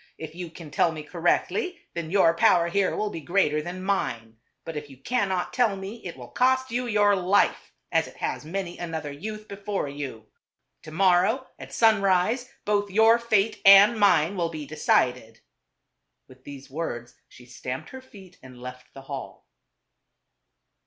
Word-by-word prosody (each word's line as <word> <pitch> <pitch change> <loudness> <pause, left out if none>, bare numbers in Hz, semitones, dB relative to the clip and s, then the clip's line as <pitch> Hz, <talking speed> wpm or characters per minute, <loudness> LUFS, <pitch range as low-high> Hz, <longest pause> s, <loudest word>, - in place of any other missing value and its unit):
' - - -45
If 155 - -18
you 175 0 -7
can 160 -2 -12
tell 165 - +2
me 155 -1 -7
cor 170 +3 -10
rectly, 360 - +1 0.2
then 170 -2 -5
your 175 -3 +4
power 170 0 +4
here 195 +2 +1
will 210 -1 -2
be 165 - -6
greater 155 -3 +1
than 180 +3 -7
mine. 115 - -2 0.3
But 165 - -6
if 150 -1 -6
you 135 - -14
cannot 190 - -1
tell 235 -5 +2
me, 195 +4 -8
it 170 -6 -7
will 125 -1 -10
cost 260 - +1
you 245 +1 -2
your 205 -2 +3
life, 190 +2 +1 0.2
as - - +2
it - - -14
has - - -3
many 175 +2 -5
another 160 -4 -4
youth 215 +8 -7
before 200 -4 -4
you. 140 -6 -7 0.6
To 155 - -11
morrow 190 - +3
at - - -10
sunrise, 215 +2 +2 0.2
both 205 -1 +1
your 220 +4 +5
fate 220 -2 +1
and 200 +3 +8
mine 185 -3 +4
will 170 -3 -1
be 155 -2 -7
decided." 125 -6 0 0.9
With 130 0 -19
these 140 -1 -10
words 130 -5 -5
she 125 - -16
stamped 125 +1 -7
her 265 - -9
feet 195 -8 -16
and 130 -1 -13
left 125 0 -10
the 135 - -9
hall. 135 -1 -8
180 Hz, 175 wpm, -25 LUFS, 145-205 Hz, 0.9 s, and